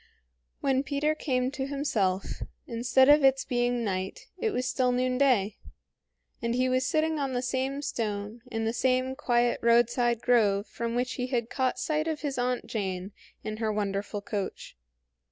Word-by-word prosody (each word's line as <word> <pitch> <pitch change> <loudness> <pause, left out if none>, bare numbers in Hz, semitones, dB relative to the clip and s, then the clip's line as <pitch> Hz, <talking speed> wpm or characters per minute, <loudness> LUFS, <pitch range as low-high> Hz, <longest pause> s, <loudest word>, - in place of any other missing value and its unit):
When 265 -1 +2
Peter 290 +2 0
came 255 -4 -1
to 270 -1 -3
himself, 215 -10 0 0.4
instead 240 +2 +3
of 295 0 +7
its 270 0 +4
being 245 -1 0
night, 190 -2 -3
it 450 - +1
was 255 -11 -1
still 250 0 +1
noonday, 250 -4 +2 0.8
and 235 0 0
he 255 +1 +2
was 255 0 +1
sitting 315 0 +1
on 275 -2 -1
the 245 0 -1
same 265 +2 -1
stone 210 -2 -3
in 225 -2 -2
the 225 - 0
same 255 +1 +1
quiet 240 -3 +1
roadside 235 0 +3
grove 210 -5 +3
from 235 0 -4
which 250 +1 0
he 250 - -1
had 240 -3 -2
caught 260 -2 0
sight 310 0 -1
of 315 -2 -2
his 280 -4 -2
Aunt 250 0 0
Jane 190 -3 -3 0.3
in 215 0 -4
her 220 -1 0
wonderful 205 0 -2
coach. 200 - -5
245 Hz, 165 wpm, -28 LUFS, 225-265 Hz, 0.8 s, of